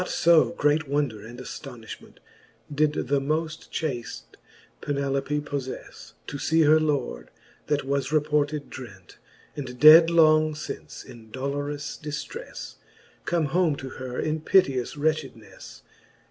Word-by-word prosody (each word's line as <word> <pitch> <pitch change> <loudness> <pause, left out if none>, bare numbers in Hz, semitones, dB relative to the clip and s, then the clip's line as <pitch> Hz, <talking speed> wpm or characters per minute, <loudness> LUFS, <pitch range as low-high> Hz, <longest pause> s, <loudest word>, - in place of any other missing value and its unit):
Not 180 - -3
io 170 -2 +7
great 150 +1 +1
wonder 140 -7 -1
and 120 +1 -11
aftoniftiment 125 -2 -9 0.6
Did 150 +1 +2
the 140 +1 0
moft 155 +3 -3
chaft 130 -8 -5 0.5
Penelope 140 0 -1
pofTefle, 140 -3 -7
To 145 - -6
fee 160 +3 +3
her 155 +1 +6
Lord, 140 - -2 0.4
that 145 -1 0
was 140 0 -1
reported 150 -1 0
drent^ 100 -8 -11 0.4
And 125 -4 -7
dead 160 +4 +9
long 155 -2 +4
fince 155 - -7
in 115 -2 -14
dolorous 145 +3 -4
diftrefle, 155 - -7 0.5
Come 170 -2 +1
home 175 -4 +2
to 135 -1 -7
her 130 -1 -6
in 155 0 -1
piteous 135 -9 +2
wretchednefle. 145 -10 -4
145 Hz, 125 wpm, -25 LUFS, 130-155 Hz, 0.6 s, dead